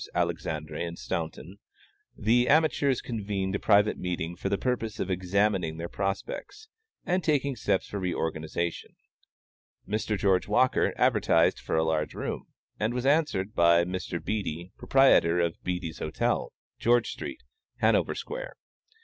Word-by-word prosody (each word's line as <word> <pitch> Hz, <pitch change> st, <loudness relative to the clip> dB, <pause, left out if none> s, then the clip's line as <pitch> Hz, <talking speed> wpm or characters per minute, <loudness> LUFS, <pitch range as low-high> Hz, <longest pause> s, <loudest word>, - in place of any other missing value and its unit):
Alexandre 75 Hz, -1 st, -2 dB
and 85 Hz, 0 st, -4 dB
Staunton, 85 Hz, +3 st, -5 dB, 0.6 s
the 120 Hz, +4 st, +3 dB
amateurs 145 Hz, -3 st, +3 dB
convened 100 Hz, -4 st, -3 dB
a 100 Hz, -, -1 dB
private 105 Hz, 0 st, +3 dB
meeting 85 Hz, -1 st, -3 dB
for 90 Hz, -, -3 dB
the 100 Hz, -, +1 dB
purpose 115 Hz, -3 st, -2 dB
of 95 Hz, -, -2 dB
examining 90 Hz, -2 st, +1 dB
their 85 Hz, +1 st, -4 dB
prospects 100 Hz, -, -4 dB, 0.4 s
and 180 Hz, 0 st, +1 dB
taking 140 Hz, -3 st, +1 dB
steps 95 Hz, -4 st, 0 dB
for 100 Hz, -, -5 dB
reorganization. 85 Hz, -2 st, -3 dB, 0.9 s
Mr. 105 Hz, +1 st, -1 dB
George 95 Hz, -1 st, +2 dB
Walker 125 Hz, +5 st, +3 dB
advertised -, -, +3 dB
for -, -, -3 dB
a 80 Hz, -, +3 dB
large 80 Hz, -2 st, -1 dB
room, -, -, -4 dB, 0.3 s
and 110 Hz, +3 st, 0 dB
was 125 Hz, +1 st, -2 dB
answered 140 Hz, -9 st, +1 dB
by 85 Hz, 0 st, +5 dB
Mr. 90 Hz, -1 st, -4 dB
Beattie, 90 Hz, -2 st, -3 dB
proprietor 110 Hz, -11 st, +4 dB
of 85 Hz, -1 st, -1 dB
Beattie's 90 Hz, -3 st, -3 dB
Hotel, -, -, -1 dB, 0.3 s
George 120 Hz, 0 st, +3 dB
street, 315 Hz, -, -7 dB, 0.3 s
Hanover -, -, +2 dB
square. -, -, -6 dB
95 Hz, 135 wpm, -28 LUFS, 85-120 Hz, 0.9 s, by